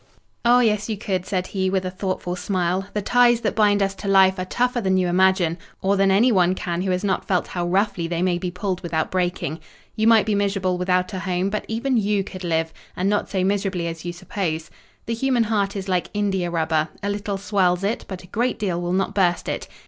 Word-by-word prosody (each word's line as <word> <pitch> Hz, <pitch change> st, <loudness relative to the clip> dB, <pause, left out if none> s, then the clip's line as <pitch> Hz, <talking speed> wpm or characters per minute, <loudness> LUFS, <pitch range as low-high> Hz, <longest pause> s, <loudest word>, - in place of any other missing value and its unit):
"Oh, 245 Hz, +1 st, +5 dB
yes, 210 Hz, -2 st, +1 dB
you 215 Hz, -, -2 dB
could," 190 Hz, -2 st, -2 dB
said 185 Hz, -2 st, -1 dB
he, 190 Hz, -1 st, -1 dB
with 190 Hz, -1 st, 0 dB
a 185 Hz, -, -3 dB
thoughtful 185 Hz, -1 st, -3 dB
smile. 185 Hz, 0 st, -1 dB
"The 210 Hz, -, -1 dB
ties 240 Hz, +1 st, +4 dB
that -, -, 0 dB
bind 205 Hz, -2 st, +3 dB
us 195 Hz, 0 st, -1 dB
to 200 Hz, -, -8 dB
life 190 Hz, -1 st, +5 dB
are 185 Hz, -, -2 dB
tougher 245 Hz, +5 st, 0 dB
than 190 Hz, -2 st, +2 dB
you 185 Hz, -1 st, +2 dB
imagine, 180 Hz, -1 st, +2 dB, 0.2 s
or 195 Hz, +1 st, +1 dB
than 195 Hz, 0 st, +3 dB
anyone 190 Hz, -3 st, +4 dB
can 175 Hz, -1 st, -3 dB
who 190 Hz, -, -1 dB
has 180 Hz, +1 st, 0 dB
not 195 Hz, -2 st, -1 dB
felt 180 Hz, -2 st, +1 dB
how 175 Hz, -1 st, -3 dB
roughly 190 Hz, -1 st, 0 dB
they 170 Hz, +1 st, -1 dB
may 180 Hz, -1 st, +1 dB
be 180 Hz, -, -3 dB
pulled 180 Hz, +1 st, -3 dB
without 165 Hz, -3 st, -2 dB
breaking. 175 Hz, -4 st, -1 dB, 0.4 s
You 220 Hz, 0 st, +1 dB
might 225 Hz, -2 st, +6 dB
be 215 Hz, -, 0 dB
miserable 195 Hz, -3 st, 0 dB
without 180 Hz, +1 st, 0 dB
a 190 Hz, -, -3 dB
home, 185 Hz, +1 st, -1 dB
but 210 Hz, -, -3 dB
even 240 Hz, +3 st, 0 dB
you 205 Hz, -2 st, +1 dB
could 185 Hz, -1 st, -9 dB
live; 165 Hz, -1 st, -1 dB, 0.2 s
and 190 Hz, +3 st, 0 dB
not 205 Hz, -, 0 dB
so 190 Hz, -2 st, 0 dB
miserably 195 Hz, -2 st, 0 dB
as 165 Hz, -1 st, -5 dB
you 175 Hz, -, -3 dB
suppose. 175 Hz, -2 st, -4 dB, 0.3 s
The 230 Hz, -, -2 dB
human 245 Hz, 0 st, +1 dB
heart 205 Hz, -2 st, 0 dB
is 195 Hz, -1 st, -4 dB
like 180 Hz, -2 st, 0 dB
india 195 Hz, -4 st, 0 dB
rubber; 160 Hz, -2 st, 0 dB, 0.2 s
a 200 Hz, -, -1 dB
little 200 Hz, -1 st, -3 dB
swells 190 Hz, -2 st, +1 dB
it, 210 Hz, +4 st, -1 dB
but 190 Hz, -2 st, -7 dB
a -, -, -12 dB
great 240 Hz, +7 st, -1 dB
deal 180 Hz, -5 st, -2 dB
will 175 Hz, 0 st, -2 dB
not 195 Hz, +1 st, 0 dB
burst 180 Hz, -3 st, +1 dB
it. -, -, -3 dB
190 Hz, 230 wpm, -22 LUFS, 180-205 Hz, 0.4 s, might